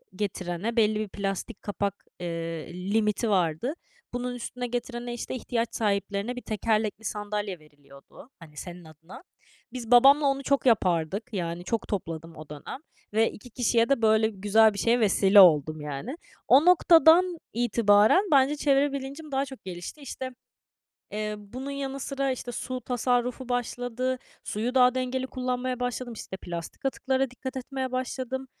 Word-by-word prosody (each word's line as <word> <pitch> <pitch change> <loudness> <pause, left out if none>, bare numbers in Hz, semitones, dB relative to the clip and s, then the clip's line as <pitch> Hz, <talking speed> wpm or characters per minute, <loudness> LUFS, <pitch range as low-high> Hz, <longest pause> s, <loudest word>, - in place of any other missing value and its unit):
getirene, 190 +2 -3
belli 215 -2 +3
bir 215 - -2
plastik 200 +3 -4
kapak, 200 -1 -3
eee, 165 -2 -4 0.2
limiti 220 +1 +1
vardı. 180 - +1 0.4
Bunun 245 0 -3
üstüne 245 +1 -5
getirene, 240 0 -4
işte, 240 - -5
ihtiyaç 235 -1 -2
sahiplerine 205 +2 -1
bir 250 - -6
tekerlekli 215 0 -1
sandalye 205 -3 -3
veriliyordu, 145 - -17
hani, 155 -3 -15
senin 175 -1 -8
adına. 160 - -13 0.5
Biz 240 -2 -6
babamla 275 +4 +7
onu 275 0 +1
çok 280 0 +1
yapardık. 195 0 +1
Yani, 170 -2 -3
çok 230 +5 -2
topladım 165 -5 -5
o 155 -1 -11
dönem 150 - -7 0.4
ve 225 +1 +3
2 245 +3 -13
kişiye 235 -1 +1
de 275 -4 +2
böyle 220 0 +4
güzel 210 +2 +4
bir 200 - -5
şeye 235 +1 +3
vesile 200 -1 +5
oldum, 155 -4 +6
yani. 150 - -5 0.3
O 280 +5 +6
noktadan 345 0 +6 0.2
itibaren 225 - +4
bence 280 +1 +5
çevre 285 -1 +2
bilincim 280 +3 -6
daha 270 +1 0
çok 265 -2 -11
gelişti. 180 - -7
İşte, 260 -1 -6 0.8
eee, 210 0 -2
bunun 255 +7 -7
yanı 275 -1 -4
sıra, 275 0 -1
işte, 245 -1 -4
su 255 +2 -4
tasarrufu 250 +1 -1
başladı, 245 +1 -2 0.3
suyu 235 +5 -2
daha 250 -1 +5
dengeli 255 0 -2
kullanmaya 255 -1 -3
başladım, 245 0 -3
işte, 200 -3 -7
plastik 170 +4 -7
atıklara 265 -1 0
dikkat 260 +1 -7
etmeye 260 0 -4
başladım. 260 +1 -3
235 Hz, 150 wpm, -27 LUFS, 200-260 Hz, 0.8 s, babamla